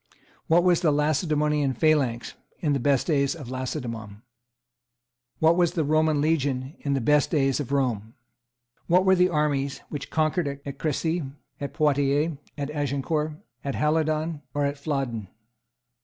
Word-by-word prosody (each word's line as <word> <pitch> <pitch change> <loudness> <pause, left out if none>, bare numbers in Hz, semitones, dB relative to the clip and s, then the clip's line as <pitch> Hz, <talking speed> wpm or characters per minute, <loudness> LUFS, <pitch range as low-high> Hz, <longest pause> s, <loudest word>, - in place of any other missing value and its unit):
What 170 +2 +4
was 180 -2 +3
the 160 -4 +3
Lacedaemonian 150 -1 +1
phalanx 135 -6 +1 0.2
in 150 -4 0
the 140 - +1
best 135 0 +2
days 140 -3 +1
of 140 -7 -8
Lacedaemon? 115 -5 -5 1.1
What 160 +1 +4
was, 175 -2 +2
the 165 - 0
Roman 155 0 +2
legion 140 -3 0
in 140 -1 -1
the - - +1
best 150 +4 +3
days 135 -4 +1
of 140 -3 -4
Rome? 120 -6 -1 0.7
What 180 +2 +4
were 190 - +6
the 180 0 +4
armies 145 -4 0
which 145 -2 -6
conquered 155 -3 0
at 140 - -7
Cressy, 160 +3 0 0.4
at 140 0 -5
Poitiers, 145 0 +2 0.2
at 145 0 -3
Agincourt, 150 +2 -1 0.3
at 140 - -3
Halidon, 155 0 0
or 145 0 +1
at 140 0 -2
Flodden? 135 -8 -2
145 Hz, 145 wpm, -25 LUFS, 135-155 Hz, 1.1 s, were